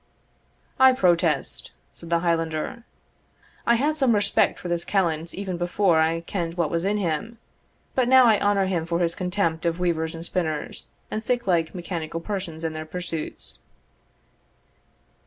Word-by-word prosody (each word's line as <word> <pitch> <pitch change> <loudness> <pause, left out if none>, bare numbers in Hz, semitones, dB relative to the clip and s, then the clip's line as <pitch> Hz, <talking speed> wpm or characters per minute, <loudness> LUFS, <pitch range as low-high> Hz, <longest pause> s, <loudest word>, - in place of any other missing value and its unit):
"I 260 0 +8
protest," 170 - +1 0.2
said 170 - -11
the 170 0 +2
Highlander, 165 +6 -1 0.8
"I 235 - +6
had 295 +6 +1
some 265 -7 +3
respect 205 - +2
for - - -7
this 170 -1 -1
callant 170 -5 0
even 190 -2 -4
before 175 -1 +2
I 165 +1 +2
ken'd 170 -1 -3
what 170 -4 0
was 170 +2 0
in 205 +2 +1
him; 200 +5 -2 0.6
but 255 -2 +2
now 260 0 +7
I 220 -3 +5
honour 200 -1 +2
him 175 -4 -1
for 170 0 0
his 170 -1 +1
contempt 180 -3 -1
of 170 -1 0
weavers 165 -2 -1
and 165 +1 -5
spinners, 160 -5 -3 0.2
and 215 - -3
sic 245 +1 0
like 170 -2 +1
mechanical 170 -2 -4
persons 170 -3 -5
and 160 -1 -2
their 155 - -4
pursuits." 170 -2 -4
175 Hz, 155 wpm, -25 LUFS, 165-200 Hz, 0.8 s, I